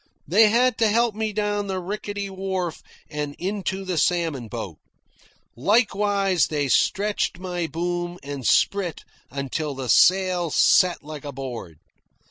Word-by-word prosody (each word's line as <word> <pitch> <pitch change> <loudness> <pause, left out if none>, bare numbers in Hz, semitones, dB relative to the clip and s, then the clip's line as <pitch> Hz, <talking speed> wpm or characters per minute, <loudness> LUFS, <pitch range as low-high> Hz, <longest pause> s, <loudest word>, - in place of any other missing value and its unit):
They 210 +7 +5
had 245 +2 +2
to 225 - +4
help 235 +1 +2
me 220 +1 -2
down 205 -1 -1
the 190 -1 -2
rickety 205 +2 -4
wharf 190 -3 -3 0.3
and 150 -2 -4
into 195 0 -3
the 180 -3 -1
salmon 165 -9 0
boat. 105 -8 -6 0.8
Likewise 200 - +2
they 145 -3 -1
stretched 205 +6 +1
my 180 -2 -3
boom 175 +1 -3
and 140 -1 -6
sprit 190 +5 +1 0.3
until 140 +2 -3
the 130 -2 -5
sail 185 -2 +4
set 180 +3 +4
like 150 -1 -8
a 145 - -5
board. 125 - -7
180 Hz, 135 wpm, -24 LUFS, 150-200 Hz, 0.8 s, They